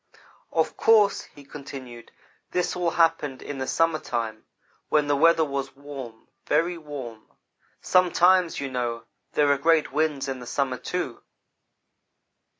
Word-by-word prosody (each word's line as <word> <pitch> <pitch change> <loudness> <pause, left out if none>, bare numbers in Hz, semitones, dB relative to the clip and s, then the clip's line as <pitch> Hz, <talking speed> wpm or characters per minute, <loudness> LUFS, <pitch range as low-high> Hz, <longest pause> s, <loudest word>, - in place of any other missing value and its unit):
"Of - - 0
course," 215 -3 +4
he 145 - -16
continued, 135 -4 -10 0.2
" - - -39
this 180 0 0
all 175 -1 0
happened 165 -5 +1
in 140 -2 -6
the 130 - -3
summer 165 -1 +2
time 115 -4 -4 0.4
when 150 -1 +3
the 145 0 +2
weather 165 +2 +4
was 140 -1 -4
warm, 135 -5 -9 0.2
very 165 +4 +2
warm. 140 -9 -8 0.5
Sometimes, 180 -1 +3
you 135 -1 -4
know, 120 -2 -2 0.3
there 145 -1 +3
are 140 - +2
great 160 0 +3
winds 150 -2 0
in 135 -1 -4
the 125 - -10
summer, 130 -1 -1
too. 135 -3 -4
145 Hz, 145 wpm, -25 LUFS, 130-165 Hz, 0.5 s, course